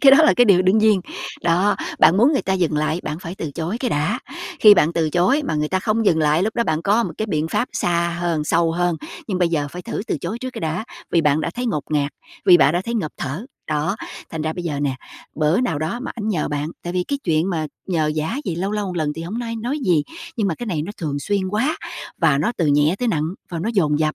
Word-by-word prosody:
Cái 270 -1 +8
đó 300 - +8
là 310 - +6
cái 245 - +6
điều 185 -5 +5
đương 185 +4 +4
nhiên. 215 -3 +4 0.4
Đó! 180 +4 +3 0.2
Bạn 165 +4 +6
muốn 245 +8 +5
người 275 - +1
ta 190 - -1
dừng 175 -5 +1
lại 155 +3 0
bạn 155 +1 -4
phải 175 -1 -7
từ 160 -5 -5
chối 170 +9 -3
cái 250 -1 -1
đã. 155 - 0 0.4
Khi 210 -2 +9
bạn 165 -1 +3
từ 160 -2 0
chối 250 - +3
mà 155 - -1
người 150 0 0
ta 185 0 0
không 220 0 0
dừng 160 - +4
lại, 155 +3 +3
lúc 220 +2 -1
đó 235 - +1
bạn 155 -4 0
có 210 +5 +3
một - - -4
cái 220 - -1
biện 160 -5 -1
pháp 245 - 0
xa 170 0 0
hơn, 165 -3 0
sâu 165 +1 +2
hơn, 175 0 +1 0.3
nhưng 190 -3 -1
bây 175 -2 +3
giờ 145 -3 -1
phải 180 +3 -7
thử - - -4
từ 160 - -1
chối 190 - -4
trước 255 +1 -5
cái - - -7
đã 160 +5 -2 0.3
vì 170 - +4
bạn 150 -1 +2
đã 165 - -2
thấy 245 0 -2
ngột 150 -10 -1
ngạt, 145 -1 0 0.3
vì 180 -2 +9
bạn 145 -3 +4
đã 175 - +1
thấy 235 - -3
ngộp 170 -10 -2
thở. 155 - -4 0.2
Đó! 155 +6 -1 0.3
Thành 160 -2 -4
ra 155 - -1
bây 175 +1 -6
giờ 145 -4 -2
nè, 140 -2 0 0.4
bữa 155 +7 +2
nào 165 -12 0
đó 160 +10 -2
mà - - -4
ảnh 220 -2 -3
nhờ 175 -8 0
bạn 150 +1 -2
tại 175 - -4
vì 180 -1 0
cái 280 -1 -1
chuyện 165 +2 +1
mà 160 -3 -1 0.2
nhờ 160 -5 +1
vả 160 - -1
gì, 180 -5 -2
lâu 190 +4 -2
lâu 210 -1 -1
một 180 - -4
lần 150 -3 0
thì 165 - -6
hổng 190 +8 -4
nai 230 -1 -4
nói 245 +7 -2
gì. 165 -5 +4 0.3
Nhưng 205 -3 +1
mà 165 - -1
cái 240 - -7
này 165 -7 -1
nó 200 +6 -5
thường 145 -4 -2
xuyên 195 +3 -1
quá, 240 +10 0 0.4
và 150 -4 +4
nó 175 +11 +1
từ 165 - +1
nhẹ 145 +3 +3
tới 245 - 0
nặng 155 -7 +1 0.2
và 170 - -4
nó 200 +8 -1
dồn 150 -6 +2
dập, 155 -1 +1
175 Hz, 280 wpm, -21 LUFS, 155-210 Hz, 0.4 s, Khi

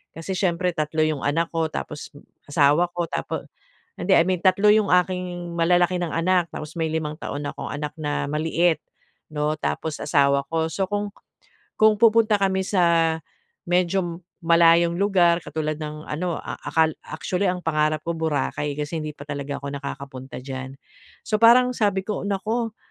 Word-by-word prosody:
Kasi 165 +4 -6
siyempre 180 -1 0
3 155 -1 0
yung 155 -2 0
anak 165 +3 0
ko 165 -1 0
tapos 150 -1 -6 0.4
asawa 145 +3 +3
ko 175 - 0
tapo 165 - -4 0.5
hindi 190 - -4
I 170 -3 +6
mean, 185 -2 0
3 195 +2 +3
yung 215 -2 +2
aking 180 -1 0
malalaki 175 +1 +2
nang 170 - -2
anak 170 +1 +1
tapos 155 +1 -7
may 165 -2 -1
limang 155 -1 -2
taon 145 -2 -5
akong 145 - -5
anak 150 0 -4
na 150 -3 -2
maliit 160 +3 +1 0.5
'no, 150 0 -1
tapos 155 0 -3
asawa 140 -2 +3
ko. 165 -1 0
So, 190 +4 -2
kung 205 0 -2 0.7
kung 215 0 +6
pupunta 225 -1 +4
kami 190 -1 +1
sa 170 -4 +3 0.5
medyo 175 0 0 0.2
malayong 170 0 +5
lugar 180 -4 +3
katulad 155 -2 -3
ng 150 0 -6
ano 170 +3 -3
a - - -7
a - - -7
akal 160 -1 +3
actually 185 +4 -2
ang 180 0 -2
pangarap 155 -1 +1
ko, 170 - -1
Boracay 150 -2 -2
kasi 150 +2 -3
hindi 155 -1 -6
pa 145 - -10
talaga 145 -1 -4
ako 140 0 -6
nakakapunta 140 -2 -7
diyan. 130 0 -6 0.5
So, 215 - -1
parang 250 +2 +6
sabi 200 -5 0
ko, 205 -1 -3
"Nako! 220 +3 -2
165 Hz, 165 wpm, -23 LUFS, 150-185 Hz, 0.7 s, I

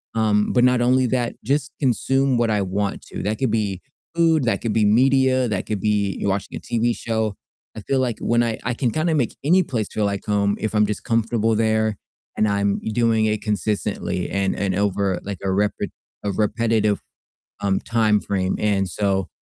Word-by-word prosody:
um, 105 -2 +2
but 125 - +4
not 125 -1 +4
only 125 +1 +3
that, 120 -1 -1
just 140 +3 0
consume 135 0 +1
what 115 -1 +1
I 105 -2 +1
want 100 +1 -2
to, - - -6
that 105 +2 -1
could 130 -4 +1
be 100 -4 -1 0.3
food, 165 -3 +3
that 115 - 0
could 115 - -1
be 110 -2 +3
media, 130 +3 +3
that 100 -3 -2
could 105 -3 -3
be 105 -2 0
watching 100 0 -2
a - - -6
TV 120 0 0
show. 110 -3 -2 0.4
I 110 - -7
feel 135 +6 0
like 125 -4 -1
when 120 0 +2
I 115 -2 -2
I 125 - -1
can 120 -2 0
kinda 160 +3 0
make 130 -7 0
any 180 +6 +4
place 110 -9 -2
feel 105 - 0
like 100 -1 -2
home 100 -1 +1
if 110 - -2
I'm 105 0 +4
just 105 0 -4
comfortable 115 -1 +1
there 110 -1 +1 0.4
and 110 - +3
I'm 100 -1 +1
doing 115 -1 +2
it 105 -1 0
consistently 105 -3 -2
and 100 -1 0
and 95 -2 -1
over, 100 -1 0
like, 100 -2 -5
a - - -2
repre 100 +2 0 0.4
a 100 - -1
repetitive, 110 0 +1 0.6
um, 100 -1 +1
timeframe, 105 -4 +1
and 100 -3 +1
so 95 -1 0
110 Hz, 190 wpm, -22 LUFS, 100-120 Hz, 0.6 s, but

